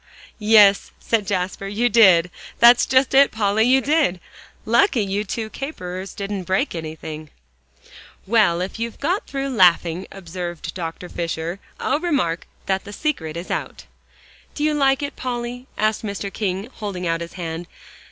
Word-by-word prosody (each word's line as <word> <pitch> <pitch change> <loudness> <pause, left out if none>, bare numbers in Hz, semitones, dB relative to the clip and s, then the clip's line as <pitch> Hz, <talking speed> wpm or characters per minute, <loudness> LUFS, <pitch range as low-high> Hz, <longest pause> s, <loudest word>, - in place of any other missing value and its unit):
"Yes," 210 -2 +5
said 220 -4 0
Jasper, 190 0 -2
"you 215 +5 +1
did. 190 -7 +5 0.3
That's 240 +1 +6
just 260 +1 +3
it, 275 +1 +6
Polly, 215 0 +1
you 260 +2 +4
did. 285 - +1 0.5
Lucky 235 - +3
you 200 +2 -1
two 220 +2 -4
caperers 190 - -6
didn't 200 -2 -4
break 190 +10 0
anything." 155 -1 -7 1.0
"Well, 195 -5 +3
if 190 +4 -5
you've 230 0 -4
got 355 +8 -1
through 275 0 -3
laughing," 180 -5 +3
observed 175 -3 -6
Dr. 170 0 -6
Fisher, 170 +1 -4 0.2
"I'll 290 - 0
remark 275 - -1 0.2
that 190 0 -1
the 205 - -10
secret 175 - -2
is 170 - -6
out." - - -4 0.7
"Do 295 - -3
you 305 0 +2
like 275 -1 +2
it, 285 - -4
Polly?" 245 0 -5
asked 215 0 +1
Mr. 200 -1 -4
King, 195 +1 -3
holding 195 -4 -4
out 165 0 0
his 170 - -7
hand. 170 -1 -5
200 Hz, 150 wpm, -21 LUFS, 180-245 Hz, 1.0 s, That's